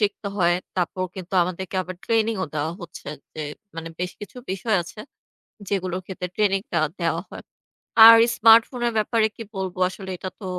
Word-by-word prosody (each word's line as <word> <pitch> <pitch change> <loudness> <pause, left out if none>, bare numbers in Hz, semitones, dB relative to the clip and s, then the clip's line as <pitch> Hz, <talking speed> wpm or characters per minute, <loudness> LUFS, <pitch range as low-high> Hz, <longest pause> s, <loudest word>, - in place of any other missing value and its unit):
শিখতে 205 -1 -1
হয়। 175 -2 +3 0.2
তারপর 185 +1 -1
কিন্তু 185 -1 -9
আমাদেরকে 185 +1 -4
আবার 185 0 -8
ট্রেনিংও 225 -4 +1
দেওয়া 155 +2 -1
হচ্ছে 175 - -9 0.3
যে 155 - -6 0.4
মানে 165 0 -5
বেশ 180 0 -2
কিছু 205 - -10
বিষয় 195 +3 0
আছে, 170 - -13 0.7
যেগুলোর 185 -2 -2
ক্ষেত্রে 180 -1 -5
ট্রেনিংটা 195 -4 0 0.2
দেওয়া 165 0 0
হয়। - - -9 0.6
আর 230 0 +12 0.2
স্মার্টফোনের 230 +1 +5
ব্যাপারে 220 +1 +2
কি 225 - -7
বলবো 190 -1 -4
আসলে 190 0 -9
এটা 185 - -5
তো - - -7
190 Hz, 160 wpm, -23 LUFS, 180-215 Hz, 0.7 s, আর